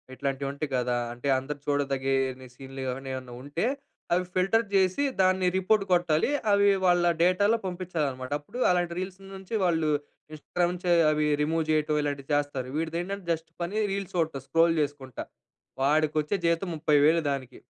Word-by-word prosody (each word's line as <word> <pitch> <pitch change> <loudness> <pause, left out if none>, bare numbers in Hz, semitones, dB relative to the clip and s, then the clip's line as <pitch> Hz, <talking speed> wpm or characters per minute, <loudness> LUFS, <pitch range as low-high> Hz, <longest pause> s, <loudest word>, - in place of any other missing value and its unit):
ఇట్లాంటి 140 0 -3
ఉంటయి 140 +1 -4
కదా! 125 0 0 0.2
అంటే 120 +3 -6
అందరు 145 +2 -6
చూడదగేని 135 -2 0
సీన్‌లు 135 0 -9
ఏవన్నా, 135 +1 -4
ఏవన్నా 130 -1 -8
ఉంటే, 145 +7 -2 0.5
అవి 180 +1 +2
ఫిల్టర్ 195 +5 +2
జేసి, 190 +6 +3 0.2
దాన్ని 185 0 +3
రిపోర్ట్ 195 +2 +2
కొట్టాలి. 175 - +2 0.2
అవి 200 0 +5 0.2
వాళ్ళ 175 -1 +4 0.2
డేటాలో 200 +5 +3
పంపించాలనమాట. 155 -8 -3
అప్పుడు 150 +12 -9
అలాంటి 175 -1 0
రీల్స్ 185 0 -5 0.2
నుంచి 190 +3 -10
వాళ్ళు 165 -3 +1 0.4
ఇన్స్టాగ్రామ్ 175 +3 -1
నుంచి, 180 0 -2 0.2
అవి 150 0 +1 0.2
రిమూవ్ 160 +1 0
జేయటం 155 -1 +1
ఇలాంటి 140 -2 -3
చేస్తారు. 145 -3 -1
వీడిదేంటంటే, 175 +4 -3
జస్ట్ 160 0 -7
పని 195 +5 -2
రీల్స్ 195 -2 -4
చూడటం, 160 -5 0
స్క్రోల్ 165 0 +3
చేసుకుంటా. 140 -4 -4 0.6
వాడికొచ్చే 155 +5 +2
జీతం 170 +3 0
30,000 155 +1 +3
దానికి. 130 -2 -5
155 Hz, 145 wpm, -27 LUFS, 140-180 Hz, 0.6 s, అవి